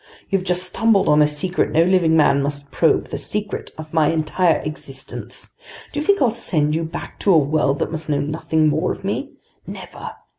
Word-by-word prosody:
You've 195 -2 +1
just 180 -1 0
stumbled 220 +2 +2
on 150 0 +5
a 150 - +5
secret 150 +5 -1
no 165 - +4
living 170 -3 +3
man 140 -2 +4
must 140 0 -4
probe, 165 - +2
the - - -4
secret 210 -1 -3
of 155 0 -9
my 160 -2 +3
entire 160 +2 +2
existence! 135 -3 -7 0.4
Do 290 - -2
you - - -1
think 400 -1 +3
I'll 240 - +3
send 150 -9 0
you 165 +1 0
back 160 - -7
to 200 - +2
a 170 - +6
world 145 -1 +1
that - - -2
must 160 -1 -5
know 145 -1 +1
nothing 155 +1 0
more 150 - +1
of - - -7
me? - - -3 0.3
Never! - - -8
160 Hz, 200 wpm, -20 LUFS, 150-185 Hz, 0.4 s, a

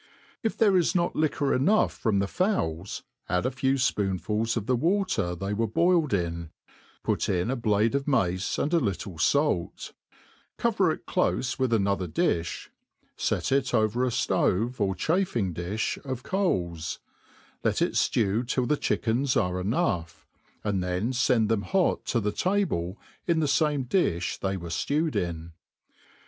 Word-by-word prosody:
If 225 - -2
there 205 -4 +4
is 175 +1 +2
not 175 -1 +1
liquor 145 -2 +1
enough 195 +12 +3
from 110 -4 0
the 100 0 +1
fowls, 100 - -1 0.3
add 90 +5 +1
a 130 - +1
few 135 +1 +1
fpoonfuls 105 -1 0
of 110 - -2
the 125 - +2
water 165 - 0
cbey 95 +4 -3
were 115 +2 0
boiled 165 - +2
IP, 85 -3 -2 0.5
put - - 0
in 90 +5 0
a - - 0
blade 110 -1 +1
of 140 +1 -1
mace, 95 -9 +1
and 150 - -1
a 170 - +5
little 100 - -3 0.2
(alt 140 - -1
i - - -32 0.4
cover - - +2
it - - -6
dofe 130 +1 0
with 130 -2 +1
another 100 -4 +1
difli; 85 +2 -1 0.5
fet - - -1
it 135 -1 +2
over 110 +3 +2
a - - +2
ftove, 120 +1 0
or 95 -2 +1
chafing 155 - 0
difh 90 +6 -3
of 130 -3 -5
coats; 85 - -1 0.7
let - - +1
it - - +2
ftew 110 +2 +1
till 125 0 0
the 150 +4 +1
chickens 125 +3 0
are 90 -2 0
enough, 90 - -1 0.4
and 100 -3 0
then 90 +7 -1
fend 120 -4 +2
tlicm 110 -1 +1
hot 190 - +1
to 120 - +1
the 105 -1 -1
table 115 - 0 0.3
in 170 -2 +2
the 155 - +1
fame 145 -2 +1
difli 120 - 0
they 95 0 -1
were 85 -2 -7
fie 145 - 0
wed 160 - -2
in. 85 -1 -3
115 Hz, 165 wpm, -27 LUFS, 95-145 Hz, 0.7 s, a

